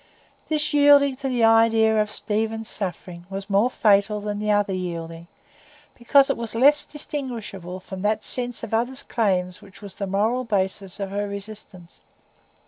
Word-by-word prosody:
This 305 -1 0
yielding 285 -2 +5
to 275 - -4
the 245 -2 0
idea 225 -1 +4
of 210 - -2
Stephen's 220 +1 -3
suffering 180 -2 -6
was 195 +1 -6
more 205 +5 +3
fatal 210 -2 +2
than 205 0 -4
the 210 0 -2
other 205 -1 +2
yielding, 170 -2 -5 0.7
because 270 +3 +4
it 275 - -1
was 230 -1 -3
less 285 +5 +4
distinguishable 230 - -6
from 185 0 -9
that 215 +1 0
sense 245 -2 -3
of 225 - -6
others' 245 +4 0
claims 180 -5 -1
which 195 -2 -16
was 200 -3 -10
the 200 - -5
moral 220 +6 0
basis 195 -3 -2
of 195 -1 -4
her 205 +1 -2
resistance. 200 -3 -10
210 Hz, 160 wpm, -23 LUFS, 195-235 Hz, 0.7 s, yielding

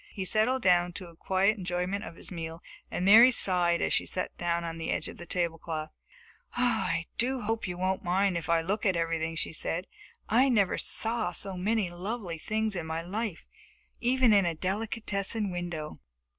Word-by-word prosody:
He 190 - -3
settled 220 +7 +2
down 175 -1 +4
to 180 0 -6
a 170 - -16
quiet 195 +5 +1
enjoyment 180 +3 -2
of 170 - -8
his - - -11
meal, 165 -1 -6 0.3
and 180 - -2
Mary 225 +6 +9
sighed 180 -7 +2
as - - +1
she - - +2
sat 185 - -4
down 170 -1 -1
at 165 -1 -4
the 165 - -4
edge - - -1
of - - -9
the 175 - -10
tablecloth. 165 -3 -2 0.6
"I 220 -9 +1
do 255 +2 +1
hope 225 0 -2
you 180 -1 -4
won't 185 +1 -1
mind 185 +1 +2
if 170 0 -4
I 165 -1 +4
look 200 +6 -2
at 190 -3 +2
everything," 165 -1 -1
she 165 - -2
said. 170 +3 -3 0.4
"I 255 +5 +4
never 205 -7 +2
saw 225 -5 0
so 195 +2 -4
many 200 0 0
lovely 180 -1 -5
things 215 +3 -1
in 170 -3 -4
my 160 +1 -3
life 205 0 -4 0.5
even 250 -1 +4
in 200 -3 +5
a 170 - -1
delicatessen 205 +2 -1
window." 175 -4 -4
185 Hz, 185 wpm, -29 LUFS, 170-215 Hz, 0.6 s, Mary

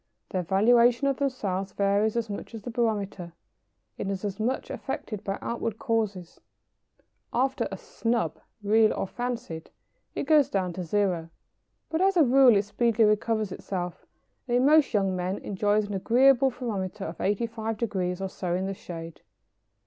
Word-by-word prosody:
Their 185 - 0
valuation 235 +8 +4
of 275 -1 +1
themselves 200 -9 -2
varies 200 +2 +1
as 230 -1 -1
much 205 +2 -7
as 220 - -8
the 245 - -5
barometer, 205 -7 -2 0.7
and 195 - -2
is 195 +1 -3
as 195 0 -4
much 245 +5 -1
affected 215 -6 -5
by 195 -1 -2
outward 230 -2 -3
causes. 210 -8 -2 0.9
After 265 0 0
a 195 - -4
"snub," 230 +4 -2 0.2
real 215 +1 +4
or - - -1
fancied, 235 -6 -5 0.5
it - - -1
goes 295 -1 +4
down 185 -3 -1
to 180 +1 -4
zero, 175 -2 0 0.6
but 320 +2 0
as 385 0 +3
a 330 - +7
rule 255 -3 +6
it 200 - +2
speedily 225 +2 +1
recovers 215 -1 +1
itself, 180 -2 -5 0.4
and 240 0 +2
in 250 - +3
most 305 0 +5
young 195 -3 +1
men 185 +2 -2
enjoys 205 +2 0
an 205 - -5
agreeable 255 +6 +4
thermometer 215 -7 -4
of 165 - -7
85° 215 -3 -2
or 195 - -1
so 180 -2 -3
in 185 +1 -1
the 195 - -2
shade! 165 -3 -9
210 Hz, 160 wpm, -27 LUFS, 190-240 Hz, 0.9 s, a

